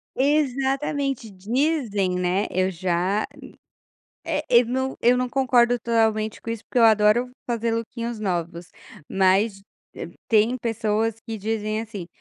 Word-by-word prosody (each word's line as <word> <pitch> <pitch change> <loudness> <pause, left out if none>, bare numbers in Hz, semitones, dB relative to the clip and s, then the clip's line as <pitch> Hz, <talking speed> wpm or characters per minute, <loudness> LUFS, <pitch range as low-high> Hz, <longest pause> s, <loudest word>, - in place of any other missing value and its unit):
Exatamente, 275 -2 0
dizem 210 - -1
né, 180 +2 0
eu 185 +1 0
já 180 +3 -1 1.0
é - - -1
eu 240 -1 +6
não 260 +2 -2
eu 245 +1 +4
não 250 0 -1
concordo 245 -2 +3
totalmente 220 -2 0
com 230 - -6
isso, 230 -2 -5
porque 250 - -2
eu 230 - +6
adoro 220 +3 +4 0.2
fazer 230 -1 -1
lookinhos 230 0 -4
novos, 175 -3 -3 0.4
mas, 195 +2 +2 0.3
eh, - - -7 0.2
tem 225 +3 +3
pessoas 225 -1 -1
que 225 -1 -6
dizem 215 +1 -2
assim: 210 -6 -7
225 Hz, 135 wpm, -23 LUFS, 200-245 Hz, 1.0 s, eu